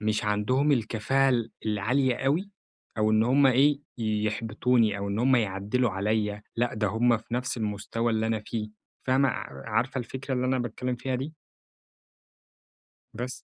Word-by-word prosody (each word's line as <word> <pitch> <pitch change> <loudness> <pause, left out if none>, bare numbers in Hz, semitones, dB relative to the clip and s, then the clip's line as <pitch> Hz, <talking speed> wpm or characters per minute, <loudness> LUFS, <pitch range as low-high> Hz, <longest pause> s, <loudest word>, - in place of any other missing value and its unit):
مش 105 0 0
عَندهم 125 +8 +2
الكفاءة 125 +3 +1
ال 120 -3 +1 0.2
العالية 120 +5 +1
أوي، 155 +9 0 0.5
أو 110 0 +3
إنّ 110 0 +4
هُم 135 +4 +4
إيه، 140 +3 +4 0.2
يحبطوني 110 +1 +1
أو 100 0 -3
إنّ 100 +2 -2
هُمَّ 130 +1 +4
يعَدّلوا 105 +3 0
عليَّ، 105 +1 -1
لأ، 120 -1 0
ده 105 0 0
هُم 115 +4 +3
في 115 +2 -7
نَفْس 125 0 -2
المُستوى 110 +2 -2
اللي 110 0 0
أنا 110 -1 0
فيه، 110 -2 -3 0.4
فاهمة؟ 130 +1 +3
ع 70 - -5
عارفة 130 +3 0
الفكرة 130 +2 -4
اللي 125 0 0
أنا 130 0 +1
باتكلّم 125 +1 -3
فيها 130 +2 -3
دي؟ 135 +5 -4 1.8
بَس. 125 +3 -4
115 Hz, 155 wpm, -27 LUFS, 105-130 Hz, 1.8 s, إنّ